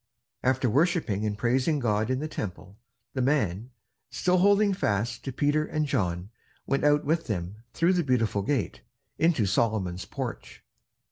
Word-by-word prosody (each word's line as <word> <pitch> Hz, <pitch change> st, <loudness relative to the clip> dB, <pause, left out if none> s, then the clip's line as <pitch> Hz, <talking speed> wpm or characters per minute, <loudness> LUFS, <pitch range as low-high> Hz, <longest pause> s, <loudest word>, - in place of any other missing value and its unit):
After 130 Hz, 0 st, +1 dB
worshipping 130 Hz, -, +1 dB
and 105 Hz, -1 st, -3 dB
praising 130 Hz, +7 st, +1 dB
God 110 Hz, -4 st, 0 dB
in 130 Hz, -, +1 dB
the 155 Hz, +4 st, -3 dB
Temple, 95 Hz, -, -7 dB, 0.3 s
the 130 Hz, -, -1 dB
man, 120 Hz, -, 0 dB, 0.4 s
still 180 Hz, +9 st, +1 dB
holding 200 Hz, +1 st, +4 dB
fast 115 Hz, -, -1 dB
to 135 Hz, -, -3 dB
Peter 145 Hz, +3 st, +1 dB
and 155 Hz, 0 st, -1 dB
John, 90 Hz, -6 st, -1 dB, 0.3 s
went 140 Hz, -, 0 dB
out 145 Hz, 0 st, +3 dB
with 165 Hz, +3 st, 0 dB
them 95 Hz, -2 st, -3 dB, 0.2 s
through 170 Hz, +2 st, +3 dB
the 175 Hz, -2 st, +1 dB
Beautiful 115 Hz, -7 st, +1 dB
Gate, 120 Hz, +2 st, -2 dB, 0.4 s
into 160 Hz, -9 st, +3 dB
Solomon's 95 Hz, -3 st, 0 dB
Porch. -, -, -6 dB
125 Hz, 150 wpm, -27 LUFS, 105-150 Hz, 0.4 s, holding